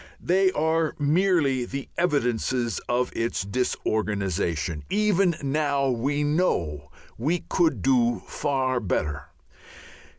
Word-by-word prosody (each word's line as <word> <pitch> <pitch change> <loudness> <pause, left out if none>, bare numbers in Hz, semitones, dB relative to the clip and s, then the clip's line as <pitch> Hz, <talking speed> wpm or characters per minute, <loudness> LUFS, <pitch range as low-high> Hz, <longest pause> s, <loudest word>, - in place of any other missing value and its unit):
They 190 +1 +2
are 160 0 +1
merely 150 -4 +2
the 135 +2 -5
evidences 125 - 0
of 125 +1 0
its 115 -3 -1
disorganization. 100 -7 -1
Even 195 -3 +2
now 140 -1 +1
we 140 +5 0
know 85 - 0 0.3
we 160 +8 0
could 170 -3 +1
do 120 -3 +2
far 130 -3 -1
better. 75 -8 -2
135 Hz, 100 wpm, -25 LUFS, 115-160 Hz, 0.3 s, They